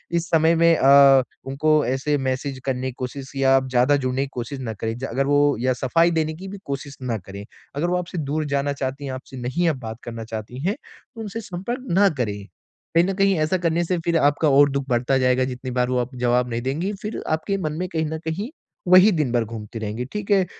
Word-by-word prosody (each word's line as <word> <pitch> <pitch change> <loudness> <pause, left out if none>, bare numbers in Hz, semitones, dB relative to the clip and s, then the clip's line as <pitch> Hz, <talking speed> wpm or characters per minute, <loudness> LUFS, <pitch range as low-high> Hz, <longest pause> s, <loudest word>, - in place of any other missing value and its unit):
इस 170 0 0
समय 165 0 +4
में 170 0 +5
अ, 135 -1 +7 0.2
उनको 150 +3 +2
ऐसे 135 +3 0
मैसेज 130 0 -2
करने 130 -1 -1
की 130 - -4
कोशिश 130 +1 -6
या 135 0 +4
ज़्यादा 130 +3 +3
जुड़ने 130 0 -1
की - - -4
कोशिश 125 +3 -5
ना 115 -4 -4
करें, 110 +2 -3 0.2
अगर 135 +4 0
वो 145 -1 +3
या 130 +1 +1
सफाई 165 +7 +2
देने 160 -1 0
की 190 +4 -9
भी 200 +1 -7
कोशिश 140 0 -5
ना 120 -3 -2
करें। 100 +1 -9 0.3
अगर 155 +5 0
वो 180 - +1
आपसे 180 0 -5
दूर 155 0 -2
जाना 140 0 0
चाहती 140 +1 -4
हैं, 135 - -4
आपसे 130 0 -9
नहीं 130 +8 -1
अब 145 -5 -2
बात 110 -1 -6
करना 115 -1 -6
चाहती 110 +3 -7
हैं, 205 - +1 0.4
तो 225 - -7
उनसे 220 +1 -5
संपर्क 210 +6 -5
ना 195 +3 +5
करें। 105 -4 -2 0.5
कहीं 170 - +6
न 195 - -1
कहीं 195 0 +3
ऐसा 155 +4 +1
करने 170 -1 0
से 180 +1 0
फिर 170 -1 +2
आपका 145 0 +3
और 145 +1 +6
दुख 140 0 -2
बढ़ता 125 +2 +2
जाएगा, 130 0 +2
जितनी 130 0 -5
बार 125 0 0
वो 125 -1 +1
आपको 125 +1 -4
जवाब 125 0 +1
नहीं 115 0 -2
देंगी, 160 +10 -2
फिर 215 +1 -4
आपके 160 +5 -1
मन - - -5
में 185 - -2
कहीं 160 -1 0
न 160 +1 -4
कहीं 195 +10 -3 0.4
वही 185 +4 +8
दिन 155 -8 0
भर 120 -2 +1
घूमती 110 0 -7
रहेंगी, 110 +3 -4
ठीक 210 +9 -5
है? 195 -2 +4
140 Hz, 230 wpm, -23 LUFS, 125-165 Hz, 0.5 s, वही